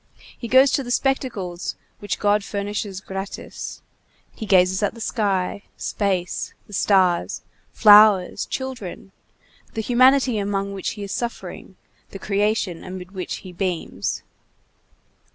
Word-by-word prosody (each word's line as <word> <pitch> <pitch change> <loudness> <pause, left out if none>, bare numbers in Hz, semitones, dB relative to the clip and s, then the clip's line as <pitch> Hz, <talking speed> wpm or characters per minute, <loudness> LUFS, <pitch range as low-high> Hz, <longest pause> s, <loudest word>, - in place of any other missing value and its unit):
He 235 - -7
goes 260 +3 +6
to 280 - +1
the 245 - -8
spectacles 245 -10 -1 0.2
which 205 - -3
God 205 0 +2
furnishes 200 -1 -4
gratis; 195 +1 -7 0.5
he 220 - -7
gazes 185 0 +4
at 205 +2 0
the - - -11
sky, 200 -4 -1 0.2
space, 190 -4 -2
the 205 - -15
stars, 185 -3 +2 0.3
flowers, 210 -3 +6
children, 250 -8 -6 0.6
the 220 - -1
humanity 255 0 +4
among 200 0 -2
which 195 - -3
he 210 - -7
is 200 - -6
suffering, 240 +3 -5 0.3
the - - -8
creation 200 -3 -1
amid 185 0 -8
which 185 -2 -4
he 185 - -9
beams. 180 -2 -3
200 Hz, 125 wpm, -22 LUFS, 190-220 Hz, 0.6 s, goes